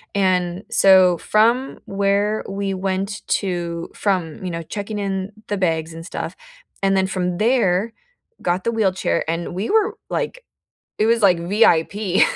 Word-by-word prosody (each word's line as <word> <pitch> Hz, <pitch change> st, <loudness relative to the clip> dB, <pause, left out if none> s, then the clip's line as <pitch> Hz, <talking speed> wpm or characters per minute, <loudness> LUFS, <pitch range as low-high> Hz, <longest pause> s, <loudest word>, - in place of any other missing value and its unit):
and 185 Hz, -1 st, +1 dB
so 190 Hz, -4 st, +6 dB
from 235 Hz, +5 st, +2 dB
where 200 Hz, +2 st, 0 dB
we 195 Hz, 0 st, -2 dB
went 195 Hz, +2 st, -2 dB
to 170 Hz, -3 st, -2 dB
from, 185 Hz, -4 st, -1 dB
you 180 Hz, -, -3 dB
know, 165 Hz, 0 st, -4 dB
checking 205 Hz, +5 st, -5 dB
in 195 Hz, 0 st, -3 dB, 0.2 s
the 205 Hz, -, -2 dB
bags 160 Hz, -3 st, -1 dB
and 165 Hz, -, -8 dB
stuff, -, -, -5 dB, 0.5 s
and 195 Hz, 0 st, +3 dB
then 190 Hz, -, +3 dB
from 180 Hz, -2 st, -2 dB
there, 220 Hz, -2 st, +2 dB, 0.5 s
got 180 Hz, +1 st, 0 dB
the 230 Hz, -, 0 dB
wheelchair, 190 Hz, -, 0 dB
and 165 Hz, +1 st, -3 dB
we 195 Hz, +4 st, -2 dB
were, 440 Hz, +1 st, +2 dB
like -, -, -3 dB, 0.6 s
it 215 Hz, -, +3 dB
was 230 Hz, 0 st, +3 dB
like 185 Hz, -4 st, +5 dB
VIP 190 Hz, +1 st, +2 dB
195 Hz, 150 wpm, -21 LUFS, 180-210 Hz, 0.6 s, so